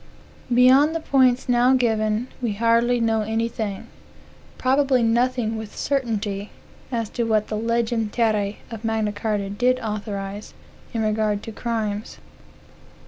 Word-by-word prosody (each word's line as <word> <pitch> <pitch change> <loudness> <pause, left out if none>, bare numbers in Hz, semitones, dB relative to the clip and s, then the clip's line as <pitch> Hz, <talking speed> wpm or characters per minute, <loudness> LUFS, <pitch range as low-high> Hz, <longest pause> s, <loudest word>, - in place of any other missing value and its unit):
Beyond 260 +6 +5
the - - 0
points 260 -4 +2
now 245 +1 +4
given, 220 -1 +1
we 235 -4 -1
hardly 230 +3 +2
know 225 -1 +1
anything, 220 -2 -2 0.7
probably 260 -1 +2
nothing 235 -1 +1
with 215 -2 -9
certainty, 215 -7 -2 0.4
as 230 -3 -1
to 240 - -1
what 215 -2 +1
the 215 - -2
"legem 230 0 0
terran" 210 -3 +1 0.2
of 225 -1 -7
Magna 220 -2 0
Carta 205 -1 -2
did 250 +5 +1
authorize, 205 -2 -5 0.4
in 225 -2 -1
regard 215 -1 0
to 225 - -6
crimes. 215 -2 -3
225 Hz, 130 wpm, -23 LUFS, 215-245 Hz, 0.7 s, Beyond